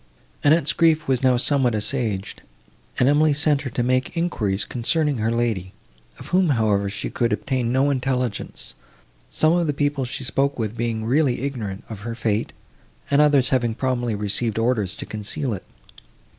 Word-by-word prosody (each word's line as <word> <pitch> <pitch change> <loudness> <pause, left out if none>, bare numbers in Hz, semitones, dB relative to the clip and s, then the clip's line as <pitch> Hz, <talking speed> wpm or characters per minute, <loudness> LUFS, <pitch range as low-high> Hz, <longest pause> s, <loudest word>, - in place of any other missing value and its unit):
Annette's 155 0 +4
grief 160 -2 +3
was 130 -2 +1
now 130 -2 +4
somewhat 130 -2 +2
assuaged, 110 -2 -2 0.6
and 125 - +3
Emily 150 +1 +4
sent 145 0 +2
her 140 - -4
to 120 0 -1
make 130 +6 0
enquiries, 105 - 0
concerning 145 +2 0
her 110 +1 0
lady, 115 -6 -1 0.4
of - - -10
whom, 180 -1 +3
however, 105 -6 +1
she 100 - -4
could 120 0 0
obtain 125 -3 -1
no 135 +3 +2
intelligence, 125 -4 -2 0.6
some 155 +1 +2
of 175 -1 +1
the 145 - 0
people 145 -1 0
she 130 +1 -4
spoke 135 +3 0
with 110 -2 -3
being 115 -1 -2
really 130 0 +2
ignorant 115 -9 -4
of 110 -3 -8
her 115 +2 -5
fate, 110 -2 -1 0.6
and 140 +1 +5
others 145 -4 +4
having 120 -4 +1
probably 120 -3 -1
received 105 +2 -1
orders 115 -5 0
to - - -7
conceal 110 +5 -3
it. 95 - -7
125 Hz, 170 wpm, -22 LUFS, 110-140 Hz, 0.6 s, and